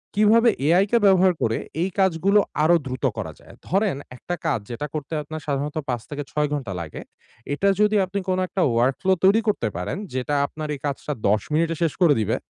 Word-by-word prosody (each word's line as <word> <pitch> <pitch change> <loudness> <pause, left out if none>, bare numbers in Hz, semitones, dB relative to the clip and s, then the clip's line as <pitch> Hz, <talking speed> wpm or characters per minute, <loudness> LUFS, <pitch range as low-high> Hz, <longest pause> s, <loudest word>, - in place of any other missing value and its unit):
কিভাবে 225 +3 +5 0.2
AI 180 +5 +5
কে 235 - +5
ব্যবহার 190 -2 +5
করে 115 0 +1 0.2
এই 185 - +1
কাজগুলো 190 +2 +3 0.2
আরো 170 +3 +5
দ্রুত 130 -1 -3
করা - - -4
যায়? - - -16
ধরেন 195 -3 +1 0.2
একটা 175 +8 -5
কাজ 135 -8 +1
যেটা 135 +6 -4
করতে 150 0 -5
আপনার 155 +1 -7
সাধারণত 145 +2 -2
৫ 120 -2 -1
থেকে 145 0 -4
৬ 150 0 +1
ঘন্টা 130 -10 -3
লাগে। 80 - -7 0.5
এটা 190 +7 0
যদি 210 0 +3
আপনি 200 +2 -3
কোন 185 - +1
একটা 190 - -2
ওয়ার্ক 120 +3 +2
ফ্লো 190 0 +3
তৈরি 200 +4 +5
করতে 200 - +1
পারেন, 90 - -3 0.2
যেটা 130 +3 -1
আপনার 155 +1 -6
এই - - -11
কাজটা 145 +1 -3
১০ 105 +1 +3
মিনিটে 165 +1 +1
শেষ 165 -3 +1
করে 170 -5 +6
দিবে। 105 - 0
155 Hz, 200 wpm, -23 LUFS, 135-190 Hz, 0.5 s, করে